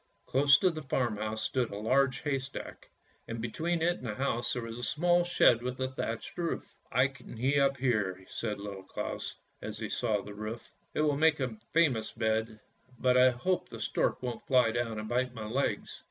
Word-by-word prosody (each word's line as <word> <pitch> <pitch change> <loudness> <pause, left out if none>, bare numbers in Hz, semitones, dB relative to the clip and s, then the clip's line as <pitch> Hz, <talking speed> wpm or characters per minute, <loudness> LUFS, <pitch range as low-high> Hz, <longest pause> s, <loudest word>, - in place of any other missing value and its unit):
Close 140 +1 +6
to 185 +3 +3
the 155 -1 -6
farmhouse 110 -5 -1
stood 125 +1 0
a 100 - -6
large 130 +3 +2
haystack, 135 -1 -4 0.4
and 115 0 -4
between 160 +9 -1
it 175 +1 +2
and 125 - -6
the 105 - -3
house 130 -2 0
there 125 - -3
was 115 +1 -6
a - - -6
small 175 +7 +3
shed 150 -9 +4
with 125 +1 -4
a 130 0 0
thatched 115 -3 -4
roof. 170 -1 -3
" - - -36
I 130 +1 +4
can 135 -3 -12
he 135 +5 +2
up 140 -1 +3
there," 105 -8 0
said 105 -3 -3
little 100 -1 -6
Claus, 95 - -5 0.3
as 110 0 -5
he 110 -1 -4
saw 110 -4 0
the 105 - -8
roof; 110 +3 -6
" - - -41
it - - +2
will 150 -2 +2
make 160 0 +4
a 130 -4 -2 0.2
famous 130 -10 +2
bed, 110 -1 0 0.4
but 125 +1 +3
I 125 0 +7
hope 165 +9 -1
the - - -8
stork - - 0
won't 125 -2 -4
fly 125 -4 +5
down 115 -1 -1
and 110 0 -4
bite 125 +1 0
my 110 -2 -5
legs." 130 +6 -1
125 Hz, 210 wpm, -31 LUFS, 110-140 Hz, 0.4 s, I